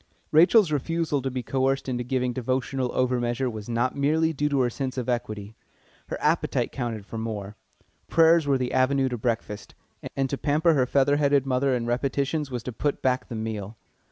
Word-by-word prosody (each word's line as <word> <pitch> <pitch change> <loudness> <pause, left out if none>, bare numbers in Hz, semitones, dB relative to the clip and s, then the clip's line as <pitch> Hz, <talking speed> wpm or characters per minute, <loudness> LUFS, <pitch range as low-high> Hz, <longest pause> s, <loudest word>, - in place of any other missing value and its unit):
Rachel's 175 +3 +5
refusal 150 0 -1
to 135 - -2
be 130 -1 -4
coerced 135 +2 0
into 125 -1 -2
giving 125 0 -1
devotional 130 +1 -1
over 125 -1 +1
measure 120 +2 -1
was 110 0 -8
not 120 +2 0
merely 160 +3 +2
due 150 0 0
to 140 -2 +2
her 125 - +2
sense 130 +1 -4
of 125 - -3
equity. 110 -4 -3 0.5
Her - - -4
appetite - - 0
counted 115 -5 -4
for 115 - -6
more. 105 -2 -5 0.5
Prayers 165 -1 +4
were 140 -1 +3
the 125 -1 -2
avenue 130 +1 +2
to 125 - -3
breakfast, 110 -3 -3 0.4
and 135 -1 +1
to 140 - -2
pamper 155 +3 +3
her 130 -4 +2
featherheaded 140 0 +3
mother 130 0 +1
in 120 -1 -2
repetitions 140 +4 -1
was 125 -3 -4
to 125 - -4
put 140 +6 -2
back 130 -1 +1
the 115 - -6
meal. 110 -1 -5
130 Hz, 185 wpm, -25 LUFS, 120-140 Hz, 0.5 s, Rachel's